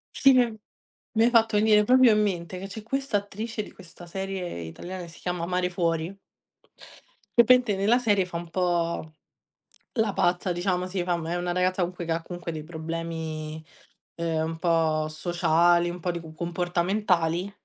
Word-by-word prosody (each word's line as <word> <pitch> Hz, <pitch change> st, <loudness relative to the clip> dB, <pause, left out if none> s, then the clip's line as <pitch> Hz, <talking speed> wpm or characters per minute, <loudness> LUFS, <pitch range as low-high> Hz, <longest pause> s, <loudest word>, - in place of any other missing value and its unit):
Sì 275 Hz, -, +6 dB
che 240 Hz, -3 st, +3 dB, 0.6 s
mi 225 Hz, -, +4 dB
hai 240 Hz, -, +5 dB
fatto 225 Hz, -3 st, +4 dB
venire 210 Hz, 0 st, +5 dB
proprio 255 Hz, +1 st, +6 dB
in 215 Hz, -, +3 dB
mente 180 Hz, -2 st, -2 dB
che 195 Hz, -, -6 dB
c'è 210 Hz, +2 st, -8 dB
questa 270 Hz, -2 st, -1 dB
attrice 215 Hz, +2 st, -5 dB
di -, -, -12 dB
questa 175 Hz, -1 st, -13 dB
serie 190 Hz, -, -4 dB
italiana 175 Hz, -, -7 dB
che 170 Hz, -, -9 dB
si 165 Hz, -, -14 dB
chiama 180 Hz, -2 st, -3 dB
Mare 180 Hz, 0 st, 0 dB
fuori 170 Hz, 0 st, -1 dB, 1.2 s
che 235 Hz, -, +10 dB
praticamente 250 Hz, -4 st, +5 dB
nella 205 Hz, +5 st, +3 dB
serie 205 Hz, -6 st, +2 dB
fa 170 Hz, -2 st, -5 dB
un 170 Hz, 0 st, -6 dB
po' 170 Hz, -3 st, -1 dB, 0.8 s
la 220 Hz, -5 st, +1 dB
pazza, 180 Hz, +1 st, +1 dB
diciamo 180 Hz, +1 st, 0 dB
sì, 185 Hz, -1 st, -2 dB
fa 175 Hz, -1 st, 0 dB
mhmm, 160 Hz, -, -5 dB
è 175 Hz, -, -1 dB
una 175 Hz, 0 st, -2 dB
ragazza 185 Hz, +1 st, +1 dB
comunque 175 Hz, 0 st, -3 dB
che 165 Hz, -, -3 dB
ha 165 Hz, 0 st, 0 dB
comunque 175 Hz, 0 st, -6 dB
dei 155 Hz, -2 st, -6 dB
problemi, 160 Hz, -1 st, -5 dB, 0.5 s
ehm, 165 Hz, -1 st, -1 dB
un 160 Hz, -, -7 dB
po' 160 Hz, -3 st, +2 dB
sociali, 170 Hz, +1 st, +2 dB
un 175 Hz, +1 st, -6 dB
po' 180 Hz, +1 st, -1 dB
di 170 Hz, -, -4 dB
cu 160 Hz, -1 st, -11 dB
comportamentali, 175 Hz, +1 st, 0 dB
175 Hz, 180 wpm, -26 LUFS, 170-200 Hz, 1.2 s, che